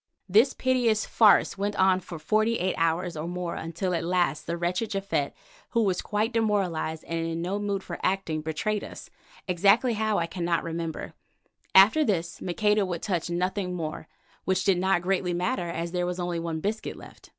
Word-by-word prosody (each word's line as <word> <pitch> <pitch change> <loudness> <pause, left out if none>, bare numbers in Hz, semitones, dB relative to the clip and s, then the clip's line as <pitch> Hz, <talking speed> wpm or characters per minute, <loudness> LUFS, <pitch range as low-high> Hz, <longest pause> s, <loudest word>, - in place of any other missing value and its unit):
This 220 +8 +4
piteous 245 -4 +1
farce 210 -2 +4
went 205 +1 -1
on 190 -1 +4
for 175 -2 -8
forty 215 +8 +1
eight 185 +1 0
hours 165 +1 0
or 155 +2 -4
more 175 -1 -3
until 170 +3 -3
at 170 - -1
last 175 -3 0
the 170 +1 -2
wretched 180 +6 -1
Japhet, 195 -8 -1 0.4
who 230 -1 +2
was 185 -3 +1
quite 215 +3 -1
demoralized 190 -8 0
and 165 0 -3
in 165 0 -3
no 195 +4 -2
mood 200 -2 -2
for - - -7
acting, 185 -5 -1
betrayed 180 +7 -2
us, - - -10 0.4
exactly 200 +7 +4
how 215 -1 0
I 170 - +1
cannot 170 -1 -1
remember. 165 -1 -4 0.6
After 215 +11 +7
this 175 - -1
Maqueda 210 +3 +1
would 175 -3 -4
touch 175 -4 -1
nothing 180 +1 -1
more, 160 -2 -5 0.4
which 190 0 +1
did 190 -3 +3
not 190 -1 +2
greatly 180 -1 0
matter 180 0 -1
as 170 0 -3
there 180 0 -1
was 180 0 -3
only 175 -1 -2
one 165 -1 -3
biscuit 215 +4 -3
left. - - -14
180 Hz, 185 wpm, -27 LUFS, 170-205 Hz, 0.6 s, After